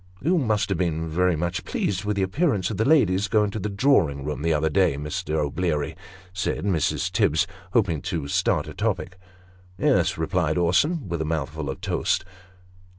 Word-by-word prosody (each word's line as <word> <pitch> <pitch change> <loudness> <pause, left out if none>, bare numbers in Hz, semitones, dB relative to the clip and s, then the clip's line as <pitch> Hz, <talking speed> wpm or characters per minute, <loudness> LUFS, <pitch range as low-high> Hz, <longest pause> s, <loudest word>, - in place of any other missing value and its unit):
" 90 - -27
You 175 +4 +3
must 110 -6 0
have 95 -4 -1
been 80 -2 -1
very 90 +2 +1
much 85 +3 -2
pleased 95 0 -2
with 105 0 0
the 100 - +1
appearance 105 - 0
of 105 - -4
the 110 - +1
ladies 105 - +3
going 105 -2 +2
to 110 - -4
the 105 - -3
Drawing 100 - +2
room 75 0 -4
the 85 +1 +1
other 80 0 +2
day, 90 -3 +2
Mr. 75 +1 -3
O'Bleary? 75 0 -1 0.2
" 90 -1 -23
said - - -2
Mrs. 90 -7 0
Tibbs, 80 +3 +2 0.3
hoping 90 -10 +2
to 80 -1 -3
start - - +1
a - - -7
topic. 95 -5 -2 0.3
" 90 0 -28
Yes," - - +2
replied 80 -1 0
Orson, 100 - +2
with 85 -2 -3
a - - +1
mouthful 80 -2 -3
of 65 - -6
toast. - - 0
90 Hz, 195 wpm, -24 LUFS, 80-105 Hz, 0.3 s, You